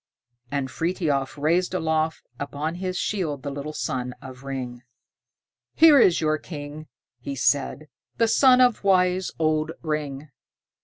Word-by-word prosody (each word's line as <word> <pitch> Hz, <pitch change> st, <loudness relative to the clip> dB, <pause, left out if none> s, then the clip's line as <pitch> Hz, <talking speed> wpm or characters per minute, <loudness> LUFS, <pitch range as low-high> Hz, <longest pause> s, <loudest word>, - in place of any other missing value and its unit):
And 140 Hz, -2 st, -2 dB
Frithiof 150 Hz, -3 st, -1 dB
raised 170 Hz, +5 st, +1 dB
aloft 160 Hz, -2 st, -1 dB
upon 145 Hz, +3 st, -3 dB
his 185 Hz, -1 st, -2 dB
shield 155 Hz, -9 st, -2 dB
the 140 Hz, -, -4 dB
little 140 Hz, +2 st, -5 dB
son 125 Hz, -4 st, -3 dB
of 130 Hz, -1 st, -11 dB
Ring. 130 Hz, -3 st, -5 dB, 0.9 s
"Here 315 Hz, -3 st, +7 dB
is 180 Hz, -7 st, +5 dB
your 155 Hz, -1 st, +1 dB
king," 150 Hz, -1 st, -8 dB, 0.3 s
he 140 Hz, +3 st, -5 dB
said, 145 Hz, +2 st, 0 dB, 0.3 s
"the 230 Hz, -, +3 dB
son 255 Hz, +2 st, +5 dB
of 245 Hz, -4 st, +3 dB
wise 185 Hz, -1 st, +3 dB
old 155 Hz, 0 st, 0 dB
Ring." 150 Hz, -2 st, -3 dB
155 Hz, 135 wpm, -24 LUFS, 140-180 Hz, 0.9 s, Here